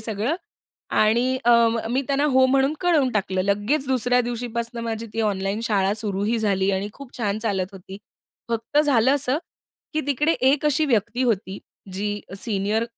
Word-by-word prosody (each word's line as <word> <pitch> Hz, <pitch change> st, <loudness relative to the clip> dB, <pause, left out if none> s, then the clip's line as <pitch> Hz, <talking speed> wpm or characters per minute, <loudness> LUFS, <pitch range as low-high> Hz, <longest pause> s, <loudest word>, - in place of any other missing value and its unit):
सगळं 220 Hz, +5 st, -1 dB, 0.7 s
आणि 240 Hz, +4 st, +2 dB
अं, 235 Hz, -1 st, +5 dB
मी 260 Hz, +3 st, +1 dB
त्यांना 280 Hz, +1 st, +1 dB
हो 260 Hz, 0 st, +5 dB
म्हणून 270 Hz, +2 st, +2 dB
कळवून 320 Hz, -8 st, +2 dB
टाकलं. 190 Hz, -3 st, 0 dB
लगेच 205 Hz, +9 st, 0 dB
दुसऱ्या 250 Hz, -1 st, +3 dB
दिवशीपासनं 235 Hz, -1 st, -4 dB
माझी 230 Hz, 0 st, -4 dB
ती 225 Hz, -, -2 dB
ऑनलाईन 200 Hz, -1 st, -1 dB
शाळा 195 Hz, -3 st, +1 dB
सुरूही 210 Hz, +1 st, -1 dB
झाली 195 Hz, -3 st, +1 dB
आणि 195 Hz, +2 st, -1 dB
खूप 275 Hz, +1 st, -12 dB
छान 210 Hz, -3 st, -1 dB
चालत 200 Hz, -4 st, -1 dB
होती. 190 Hz, 0 st, -10 dB, 0.5 s
फक्त 230 Hz, +5 st, -1 dB
झालं 270 Hz, -3 st, +4 dB
असं, 280 Hz, 0 st, 0 dB, 0.6 s
की 310 Hz, -, +1 dB
तिकडे 290 Hz, +3 st, +2 dB
एक 270 Hz, +3 st, +3 dB
अशी 300 Hz, +1 st, +2 dB
व्यक्ती 240 Hz, 0 st, 0 dB
होती 200 Hz, -5 st, -1 dB, 0.3 s
जी 205 Hz, +2 st, -3 dB
अ, -, -, -7 dB
सीनियर 215 Hz, +1 st, 0 dB
230 Hz, 160 wpm, -23 LUFS, 205-260 Hz, 0.7 s, अं